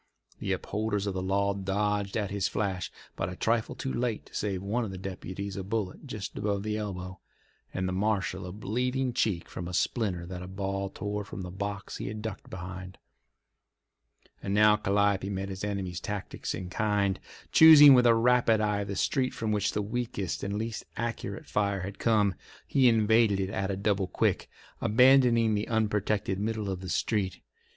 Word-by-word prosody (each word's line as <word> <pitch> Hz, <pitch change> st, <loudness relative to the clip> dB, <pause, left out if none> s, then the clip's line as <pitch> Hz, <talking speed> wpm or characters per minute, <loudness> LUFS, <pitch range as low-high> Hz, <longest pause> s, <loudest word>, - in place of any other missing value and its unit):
The -, -, -2 dB
upholders 105 Hz, -1 st, -2 dB
of 100 Hz, -, -2 dB
the 95 Hz, -, -2 dB
law 100 Hz, +2 st, +1 dB
dodged 100 Hz, +1 st, -1 dB
at 105 Hz, -3 st, -2 dB
his 100 Hz, -1 st, 0 dB
flash, 95 Hz, -3 st, -2 dB, 0.2 s
but 85 Hz, -, -2 dB
a 90 Hz, -, -6 dB
trifle 115 Hz, +3 st, 0 dB
too 130 Hz, -, -4 dB
late 120 Hz, -2 st, -2 dB
to -, -, -20 dB
save 100 Hz, -3 st, -2 dB
one 110 Hz, +5 st, 0 dB
of 110 Hz, -, -4 dB
the 95 Hz, -, -6 dB
deputies 95 Hz, +1 st, -6 dB
a 95 Hz, -, -4 dB
bullet 105 Hz, +5 st, -3 dB
just 105 Hz, -6 st, -6 dB
above 100 Hz, -1 st, -1 dB
the 105 Hz, 0 st, -2 dB
elbow, 95 Hz, -3 st, -5 dB, 0.5 s
and 95 Hz, 0 st, -2 dB
the -, -, -1 dB
marshal 95 Hz, -2 st, -1 dB
a -, -, -6 dB
bleeding 125 Hz, +5 st, -1 dB
cheek 100 Hz, -8 st, 0 dB
from 85 Hz, -, -6 dB
a 90 Hz, -, -4 dB
splinter 95 Hz, -7 st, 0 dB
that 90 Hz, 0 st, -7 dB
a 90 Hz, -, -7 dB
ball 100 Hz, +1 st, -3 dB
tore 105 Hz, +2 st, -4 dB
from 100 Hz, -, -7 dB
the 90 Hz, -, -6 dB
box 100 Hz, +1 st, -5 dB
he -, -, -5 dB
had 105 Hz, +1 st, -5 dB
ducked 110 Hz, -3 st, -6 dB
behind. 90 Hz, +1 st, -7 dB, 1.4 s
And 100 Hz, 0 st, -2 dB
now 105 Hz, 0 st, +6 dB
Calliope 100 Hz, -1 st, +1 dB
met 95 Hz, 0 st, -3 dB
the 100 Hz, +2 st, -4 dB
enemy's 95 Hz, -4 st, -3 dB
tactics 105 Hz, 0 st, -4 dB
in 90 Hz, -1 st, -6 dB
kind. 100 Hz, -2 st, +1 dB, 0.3 s
Choosing 150 Hz, -3 st, +10 dB
with 125 Hz, -1 st, +6 dB
a 115 Hz, -, +6 dB
rapid 115 Hz, -1 st, +4 dB
eye 105 Hz, -1 st, 0 dB
the 100 Hz, 0 st, -5 dB
street 130 Hz, +6 st, 0 dB
from 110 Hz, -1 st, -2 dB
which 105 Hz, +1 st, 0 dB
the 105 Hz, -, -1 dB
weakest 110 Hz, -6 st, -3 dB
and 100 Hz, +1 st, -2 dB
least 110 Hz, 0 st, -4 dB
accurate 115 Hz, -4 st, -4 dB
fire 100 Hz, -2 st, 0 dB
had 100 Hz, +2 st, -6 dB
come, 105 Hz, -4 st, +3 dB, 0.3 s
he 130 Hz, -3 st, +4 dB
invaded 110 Hz, -2 st, +4 dB
it 95 Hz, 0 st, -1 dB
at 95 Hz, 0 st, -2 dB
a 95 Hz, -, -2 dB
double 100 Hz, -1 st, 0 dB
quick, -, -, 0 dB, 0.3 s
abandoning 120 Hz, -1 st, +5 dB
the 105 Hz, 0 st, -1 dB
unprotected 105 Hz, -3 st, 0 dB
middle 105 Hz, -1 st, -2 dB
of 95 Hz, -, -4 dB
the 95 Hz, -1 st, -7 dB
street. 95 Hz, +4 st, -1 dB
100 Hz, 185 wpm, -29 LUFS, 95-110 Hz, 1.4 s, Choosing